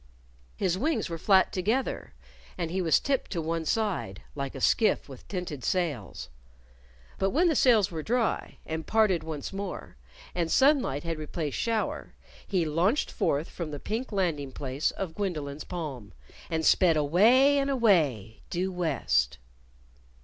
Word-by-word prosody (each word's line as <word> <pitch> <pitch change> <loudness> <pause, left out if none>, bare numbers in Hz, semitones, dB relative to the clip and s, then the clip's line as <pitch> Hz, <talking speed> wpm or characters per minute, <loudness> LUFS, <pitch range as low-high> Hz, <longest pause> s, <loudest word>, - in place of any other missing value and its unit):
His 185 -1 0
wings 300 - 0
were 165 - -4
flat 190 +2 +4
together 215 - -1 0.4
and 170 -2 -3
he 190 +1 -1
was 165 -3 +4
tipped 275 -2 -1
to 170 - -2
one 165 0 -2
side, 195 - -1
like 140 -1 -5
a - - -5
skiff 215 - +2
with 135 -3 -12
tinted 175 -9 -5
sails. 155 - -2 0.9
But 195 - +2
when 330 - +3
the 320 - +2
sails 220 -8 +4
were 160 -2 -4
dry, 235 +6 -1
and 160 0 -4
parted 215 -6 +3
once 155 +1 -5
more, 195 - -6 0.4
and 170 -2 -1
sunlight 265 - +3
had 165 -2 -3
replaced 155 -1 -4
shower, 225 -2 -2 0.3
he 185 -5 +1
launched 175 - +1
forth 145 +4 0
from 170 -3 -5
the 145 -1 -6
pink 230 - -4
landing 165 -9 -1
place 135 +2 -2
of 185 -4 -5
Gwendolyn's 155 -7 -4
palm 140 - -6 0.4
and 160 -1 -1
sped 170 -4 +5
away 230 - +5
and 275 0 0
away, 160 - +2
due 185 +2 -1
west! 90 - 0
175 Hz, 150 wpm, -28 LUFS, 150-210 Hz, 0.9 s, sped